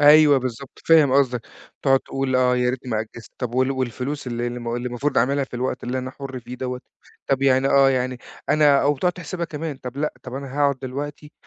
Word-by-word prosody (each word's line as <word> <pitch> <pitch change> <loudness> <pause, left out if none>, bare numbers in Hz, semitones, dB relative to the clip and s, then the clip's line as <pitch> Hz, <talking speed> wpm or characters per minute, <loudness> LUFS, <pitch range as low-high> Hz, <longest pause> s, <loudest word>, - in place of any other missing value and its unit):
أيوه 150 -1 +7
بالضبط، 130 +1 -6
فاهم 155 -5 +6
قصدك، 130 -3 +3 0.4
بتقعُد 135 -1 +4
تقول: 135 -1 -1
"آه 125 0 +3
يا 125 0 +2
ريتني 125 0 -6
ما 110 - +1
أجِّزت"، 110 +1 -10
طَب 125 -2 -3
وال 130 +1 +2
والفلوس 130 +2 -3
ال 125 - -3
اللي 120 +1 -2
الم 120 -1 -4
اللي 120 +1 -3
المفروض 125 +4 0
أعملها 140 +4 +2
في 130 - -13
الوقت 125 +2 -2
اللي 125 +1 -2
أنا 130 0 -4
حُر 135 -2 -7
فيه 120 +2 -8
دوّة، 125 0 -4 0.5
طَب 135 0 +1
يعني 135 0 +4
آه، 135 -1 +5
يعني 130 -1 -1 0.3
أنا 145 -2 +5
أو 145 +1 +2
تقعُد 180 +3 +2
تحسبها 175 0 -5
كمان، 155 -2 -5
طَب 125 0 -8
لأ، 150 +1 -1
طَب 130 0 -8
أنا 140 +1 -5
هاقعُد 140 -2 +2
دلوقتي، 145 +3 -6
130 Hz, 220 wpm, -23 LUFS, 125-145 Hz, 0.5 s, أيوه